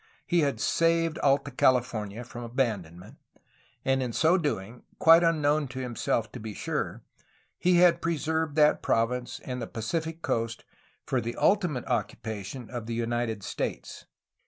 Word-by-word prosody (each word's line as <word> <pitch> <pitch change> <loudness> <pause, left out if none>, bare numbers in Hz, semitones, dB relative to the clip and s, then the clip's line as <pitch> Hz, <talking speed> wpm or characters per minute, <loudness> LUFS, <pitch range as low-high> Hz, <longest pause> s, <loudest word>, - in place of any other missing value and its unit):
He 175 -1 +2
had 140 -7 +1
saved 165 +2 +2
Alta 140 0 +2
California 120 -5 +1
from 120 0 -8
abandonment, 105 -9 -3 0.7
and 135 0 +2
in 125 -2 -2
so 160 +7 +4
doing, 125 - -2 0.2
quite 165 +1 +7
unknown 155 -3 +2
to 130 +1 -7
him 125 -2 -5
self 115 0 0
to 125 - -8
be 110 -2 -7
sure, - - -3 0.6
had 180 -1 +5
preserved 160 -1 -1
that 150 -1 +4
province 120 +2 0
and 125 -1 -4
the 115 - -4
Pacific 160 +8 -4
coast 115 0 -2 0.4
for 130 - 0
the 120 +1 -4
ultimate 180 - +1
occupation 110 +2 -4
of 120 -3 -5
the 115 - -3
United 115 -2 -2
States. - - -5
125 Hz, 145 wpm, -28 LUFS, 115-160 Hz, 0.7 s, quite